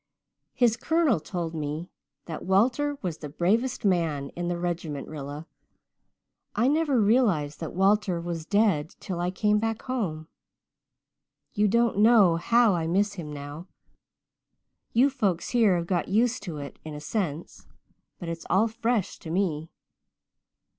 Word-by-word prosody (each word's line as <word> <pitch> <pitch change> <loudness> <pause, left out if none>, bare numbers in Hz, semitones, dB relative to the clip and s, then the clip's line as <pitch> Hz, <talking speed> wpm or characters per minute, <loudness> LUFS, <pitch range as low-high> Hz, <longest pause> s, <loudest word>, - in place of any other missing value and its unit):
His 240 -3 +3
colonel 320 - +2
told 170 0 -4
me 155 +2 -4 0.3
that 160 -2 -6
Walter 245 +10 +2
was 170 -4 -3
the 150 - -7
bravest 220 - 0
man 160 -7 +1
in 175 0 -5
the 175 0 -1
regiment. 170 -4 -3
Rilla, 145 +1 -7 1.1
I 235 +4 +2
never 295 -3 +2
realized 200 - +2
that 165 -1 -6
Walter 195 -1 +2
was 170 -1 -5
dead 200 -7 +1
till 185 -4 -5
I 175 +1 0
came 210 +3 +1
back 225 0 -2
home. 180 -12 -3 1.3
You 210 +1 +2
don't 235 0 +2
know 210 -6 +6
how 230 +4 +4
I 165 -2 -1
miss 200 +4 +1
him 165 -6 -7
now 145 +4 -8 1.2
you 245 +4 +5
folks 200 -10 -1
here 220 -7 +3
have 170 - -2
got 175 -1 -1
used 230 +5 +1
to 165 -5 -5
it 140 -1 -8
in 155 -1 -7
a - - -6
sense 160 -1 -4 0.5
but 175 - -8
it's 165 0 -6
all 200 +5 +4
fresh 225 -2 -1
to 160 - -9
me. 165 -3 -1
185 Hz, 145 wpm, -26 LUFS, 160-225 Hz, 1.3 s, know